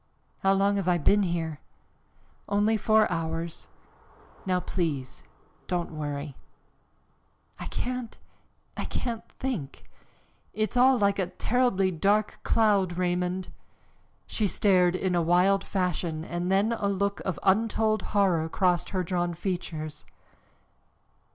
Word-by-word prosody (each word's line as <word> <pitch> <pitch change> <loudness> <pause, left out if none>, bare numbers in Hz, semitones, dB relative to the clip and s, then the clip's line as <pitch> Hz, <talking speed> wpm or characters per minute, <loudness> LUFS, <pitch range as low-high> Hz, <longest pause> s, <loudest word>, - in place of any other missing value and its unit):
"How 195 0 +3
long 200 +1 +2
have 195 -2 -2
I 180 -1 +4
been 200 +6 +3
here?" 165 -5 -2 0.9
"Only 205 +2 +2
four 215 0 +4
hours. 165 0 -3 0.8
Now 185 -1 +2
please, 155 -9 -3 0.5
don't 175 -2 -2
worry." 145 -2 -5 1.2
"I - - -5
can't 250 -2 -4 0.6
I - - -3
can't 230 -3 -3
think 210 - -5 0.7
it's 215 +1 -1
all 255 +1 +5
like 200 -2 +2
a 185 - +1
terribly 195 0 +1
dark 205 +5 +1
cloud, 200 -6 +2
Raymond." 180 +1 -1 0.8
She 215 - 0
stared 185 -3 +3
in 185 0 -1
a 175 - +2
wild 180 +4 +3
fashion 175 -4 -2
and 175 +2 -2
then 200 +4 +3
a 215 -3 -1
look 200 0 0
of 185 - -3
untold 215 +2 +2
horror 180 -6 +1
crossed 180 -1 +1
her 185 -2 -1
drawn 175 -1 -1
features. 165 -4 -4
185 Hz, 120 wpm, -27 LUFS, 175-205 Hz, 1.2 s, all